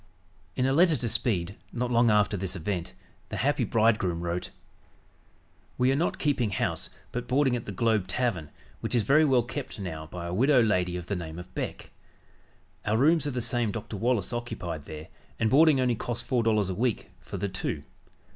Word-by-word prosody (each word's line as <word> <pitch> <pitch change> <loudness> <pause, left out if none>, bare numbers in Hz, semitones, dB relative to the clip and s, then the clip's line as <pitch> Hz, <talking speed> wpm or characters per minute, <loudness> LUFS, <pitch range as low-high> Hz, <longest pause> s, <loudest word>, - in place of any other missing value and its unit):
In 130 - +1
a 135 - +2
letter 165 +2 +5
to 120 -3 -2
Speed, 100 -5 0
not 125 0 -2
long 120 0 +4
after 105 -1 +3
this 95 0 -3
event, 90 0 -3 0.3
the - - -4
happy - - +1
bridegroom 105 -6 +2
wrote: 85 +1 -2 1.3
"We 125 +1 +3
are - - +2
not 160 +5 0
keeping 135 -7 +1
house 95 - -2 0.2
but 120 0 -4
boarding 130 -1 +3
at 120 - -4
the - - -5
Globe 105 -1 +1
Tavern, 95 - -1 0.3
which - - -2
is 115 - +3
very 145 +9 +5
well 130 -5 +4
kept 115 -2 -6
now 80 -5 -5
by 85 +2 -7
a 85 - -4
widow 130 +7 +4
lady 90 -5 +1
of 90 - -6
the 100 - -2
name 80 -2 -6
of 90 +1 -10
Beck. - - -5 0.9
Our 105 +1 +1
rooms 155 +4 +4
are - - +1
the 125 -3 -2
same 120 -1 0
Dr. 110 0 -6
Wallace 115 -1 0
occupied 90 -10 -4
there, 75 0 -8 0.3
and 110 -1 +2
boarding 150 0 +6
only 125 -1 +2
costs 120 +1 -4
four 125 -2 +2
dollars 110 -4 +2
a - - -1
week 115 -1 -1
(for 95 +2 -7
the 100 +2 -1
two). 95 - -3
110 Hz, 195 wpm, -28 LUFS, 90-125 Hz, 1.3 s, boarding